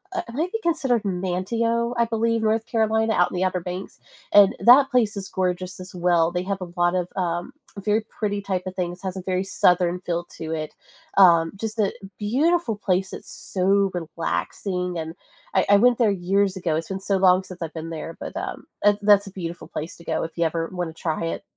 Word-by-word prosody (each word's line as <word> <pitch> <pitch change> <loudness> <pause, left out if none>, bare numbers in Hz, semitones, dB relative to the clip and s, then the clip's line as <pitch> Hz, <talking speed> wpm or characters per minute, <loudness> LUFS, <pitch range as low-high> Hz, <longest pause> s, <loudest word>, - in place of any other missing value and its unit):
uh, 360 - 0
it 235 - -9
might 335 - -1
be 450 - -1
considered 275 -9 +1
Manteo, 215 +6 -1
I 235 - +3
believe, 230 0 0
North 220 +1 +1
Carolina 220 -1 +1
out 180 - +2
in - - -5
the 180 - 0
Upper 185 -1 0
Banks, 180 +2 -7 0.3
and 205 -1 +7
that 265 +3 +7
place 225 -5 +2
is 195 -1 -4
gorgeous 185 -1 -2
as 185 0 -10
well. 175 -2 +2
They 180 +1 -2
have 195 0 -3
a 175 - -6
lot 175 +1 +2
of, 180 -1 -1
um, 175 +3 -2 0.3
very 210 +2 +1
pretty 205 -2 -2
type 190 -2 -2
of 185 - -6
things. 175 -1 -3
It - - -3
has 185 - -4
a - - -4
very 185 0 -1
southern 180 -2 +2
feel 175 -1 -2
to 160 0 -5
it. 155 -1 -4 0.4
Um, 170 -4 +6
just 220 +2 -4
a 205 -2 +2 0.3
beautiful 260 - +1
place. 190 -1 0
It's - - -8
so 195 +1 +1
relaxing, 175 - -3
and 160 0 -5 0.4
I 190 - +3
I 205 - +7
went 240 +3 +4
there 230 - +4
years 195 +1 +1
ago. 170 -4 -1
It's 165 +1 -3
been 190 0 -3
so 195 0 0
long 185 0 +4
since 185 -2 -11
I've 160 -1 -4
been 160 0 -6
there, 165 +1 -6
but, - - -7
um, - - -5 0.2
eh, 205 - +6
that's 205 -1 +5
a - - -8
beautiful 175 -2 -6
place 155 +2 -6
to 170 - -14
go - - -1
if 165 - -6
you 170 - +2
ever 165 0 -1
wanna 175 -3 -4
try 160 0 -2
it. 165 - -4
190 Hz, 220 wpm, -24 LUFS, 175-210 Hz, 0.4 s, and